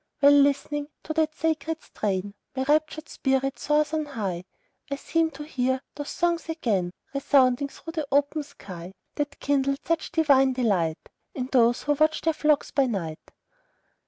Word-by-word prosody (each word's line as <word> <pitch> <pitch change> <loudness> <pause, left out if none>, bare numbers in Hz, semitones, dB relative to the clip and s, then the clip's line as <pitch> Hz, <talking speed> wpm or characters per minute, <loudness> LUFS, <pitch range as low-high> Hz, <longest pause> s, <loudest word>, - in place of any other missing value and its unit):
While 285 0 +7
listening 285 +1 +3 0.2
to 310 - -4
that 310 -1 +1
sacred 320 -1 -1
strain, 200 -1 -2 0.2
My 260 - 0
raptured 310 +2 +1
spirit 270 0 0
soars 300 +1 +1
on 310 -1 0
high; 195 -10 -4 0.4
I 280 - -1
seem 325 +3 0
to 295 -1 -9
hear 260 -3 -1
those 290 0 -6
songs 340 -1 0
again 210 - 0 0.2
Resounding 275 -1 +3
through 325 +3 -10
the 310 -4 -2
open 285 +2 +2
sky, 190 - -10 0.2
That 290 -1 -3
kindled 275 0 0
such 330 -1 -1
divine 275 -5 +4
delight, 195 -11 +1 0.4
In 255 0 -3
those 240 -2 +4
who 295 - +2
watched 310 +2 +2
their 325 - +3
flocks 300 -1 +1
by 275 -2 +2
night. 170 -9 -3
280 Hz, 160 wpm, -26 LUFS, 255-310 Hz, 0.4 s, While